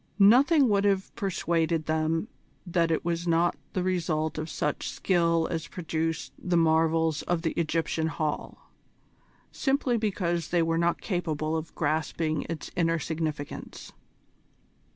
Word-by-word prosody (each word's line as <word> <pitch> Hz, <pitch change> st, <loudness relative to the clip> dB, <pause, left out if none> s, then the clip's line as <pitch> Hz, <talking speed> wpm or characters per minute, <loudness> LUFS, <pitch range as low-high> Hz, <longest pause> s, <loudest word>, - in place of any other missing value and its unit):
Nothing 265 Hz, -, +6 dB
would 200 Hz, -2 st, +2 dB
have 195 Hz, -1 st, +1 dB
persuaded 165 Hz, -4 st, 0 dB
them 160 Hz, +4 st, 0 dB, 0.4 s
that 170 Hz, -2 st, +1 dB
it 165 Hz, 0 st, 0 dB
was 170 Hz, 0 st, -1 dB
not 170 Hz, +1 st, +3 dB, 0.2 s
the 185 Hz, -, 0 dB
result 160 Hz, -4 st, -1 dB
of 155 Hz, +1 st, -4 dB
such 150 Hz, -1 st, -2 dB
skill 170 Hz, -3 st, +1 dB
as 165 Hz, -1 st, -3 dB
produced 165 Hz, -2 st, -3 dB
the 180 Hz, -1 st, 0 dB
marvels 160 Hz, -1 st, +3 dB
of 175 Hz, -1 st, -1 dB
the 165 Hz, -, +1 dB
Egyptian 165 Hz, -1 st, 0 dB
Hall, 155 Hz, -2 st, -4 dB, 0.8 s
simply 270 Hz, -3 st, +1 dB
because 180 Hz, -6 st, -1 dB
they 175 Hz, -1 st, +2 dB
were 165 Hz, 0 st, +1 dB
not 170 Hz, 0 st, +1 dB
capable 160 Hz, -5 st, -1 dB
of 160 Hz, 0 st, -5 dB
grasping 155 Hz, 0 st, -1 dB
its 165 Hz, -2 st, -5 dB
inner 165 Hz, -1 st, +2 dB
significance. 155 Hz, -2 st, -5 dB
165 Hz, 130 wpm, -28 LUFS, 160-175 Hz, 0.8 s, Nothing